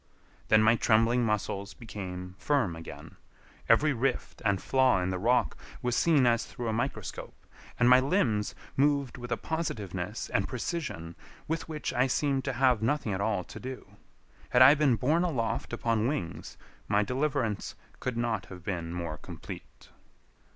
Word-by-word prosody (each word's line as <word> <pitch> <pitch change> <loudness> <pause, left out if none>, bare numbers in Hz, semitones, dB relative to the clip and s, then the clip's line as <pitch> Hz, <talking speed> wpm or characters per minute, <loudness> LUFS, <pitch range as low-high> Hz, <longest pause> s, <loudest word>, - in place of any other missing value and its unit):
Then 110 0 +5
my 110 +2 +5
trembling 115 +2 +3
muscles 100 -2 -2
became 90 -5 -7
firm 135 - +1
again, 80 0 -10 0.5
every 155 0 +5
rift 130 +2 -2
and 100 -3 +2
flaw 130 -3 +3
in 90 +1 -1
the 90 - -2
rock 120 +5 +2 0.3
was 125 -1 0
seen 155 -6 +4
as 115 -1 +3
through 120 - -6
a - - 0
microscope, 115 +2 -4 0.4
and 120 - +5
my 125 +1 +8
limbs 130 - +1 0.2
moved 140 -2 +1
with 120 0 -8
a - - +1
positiveness 105 - -4
and - - +1
precision 125 - -4 0.3
with 160 +1 -3
which 155 -1 -3
I 125 +2 +3
seemed 135 0 0
to 135 - -1
have 125 -3 +3
nothing 115 -2 0
at 95 - -2
all 100 -3 0
to - - -10
do. 130 0 -7 0.6
Had 125 - +7
I 135 +3 +9
been 145 -4 +3
borne 150 +9 +2
aloft 125 -11 -1
upon 115 -1 0
wings, 130 - -4 0.3
my 105 +1 +3
deliverance 130 -4 -1 0.2
could 125 -2 -3
not 115 -4 -1
have 90 -2 -10
been 85 -3 -3
more 85 -3 -4
complete. - - -10
120 Hz, 160 wpm, -29 LUFS, 100-135 Hz, 0.6 s, I